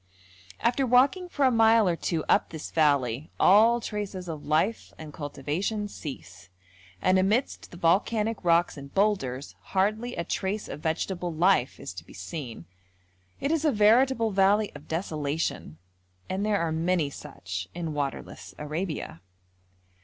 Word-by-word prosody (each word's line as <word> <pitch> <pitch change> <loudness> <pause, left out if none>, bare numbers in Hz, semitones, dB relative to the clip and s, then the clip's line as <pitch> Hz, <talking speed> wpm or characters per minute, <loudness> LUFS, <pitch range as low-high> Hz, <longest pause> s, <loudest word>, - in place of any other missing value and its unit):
After 245 +4 +1
walking 270 +9 +3
for 285 -5 +1
a 260 - +5
mile 225 -2 +5
or 175 - +2
two 165 -1 -2
up - - +3
this 160 -2 -7
valley 140 -3 +1
all 225 +5 +6
traces 205 -5 -5
of 155 -3 -6
life 160 +9 0
and 155 -2 -9
cultivation 155 +9 -3
cease, 100 - -9 0.5
and 185 0 +4
amidst 210 +8 0
the 175 - -11
volcanic 210 +6 +1
rocks 170 -1 +3
and 140 0 -10
boulders 185 -11 0
hardly 215 +5 -1
a 170 - -2
trace 195 +4 -3
of - - -7
vegetable 175 +3 -2
life 165 -5 +2
is - - -7
to 90 -2 -9
be - - -15
seen. 115 - -7 0.7
It 280 - -1
is 320 -2 +1
a 305 - +3
veritable 230 +2 +4
valley 200 +2 +3
of 145 - -12
desolation, 150 - -3 0.5
and 190 +2 -2
there 210 -1 +2
are 170 -1 -1
many 160 -2 0
such 95 -12 -7
in 165 -3 -3
waterless 145 -2 -5
Arabia. 150 - -4
175 Hz, 145 wpm, -27 LUFS, 150-215 Hz, 0.7 s, all